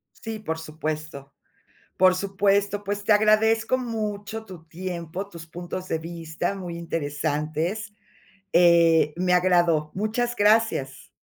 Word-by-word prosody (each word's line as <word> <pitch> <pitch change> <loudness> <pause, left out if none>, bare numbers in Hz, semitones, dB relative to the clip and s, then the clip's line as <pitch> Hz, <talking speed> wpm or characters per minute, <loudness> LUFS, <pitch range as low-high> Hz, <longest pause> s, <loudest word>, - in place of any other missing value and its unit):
Sí, 225 -1 -6
por 160 -6 -4
supuesto. 155 -3 -6 0.6
Por 185 0 +5
supuesto, 200 +1 +1
pues 205 0 -3
te 215 - +4
agradezco 220 +3 +3
mucho 220 -3 -4
tu 180 -5 -11
tiempo, 175 +2 -6
tus 170 -4 -11
puntos 175 +3 -7
de 160 - 0
vista 165 +2 -4
muy 180 -3 -6
interesantes. 160 +5 -2 0.6
Eh, 170 -3 +5
me 180 0 +1
agradó. 175 -4 +3
Muchas 225 +4 -1
gracias. 210 - +1
180 Hz, 115 wpm, -25 LUFS, 160-205 Hz, 0.6 s, Por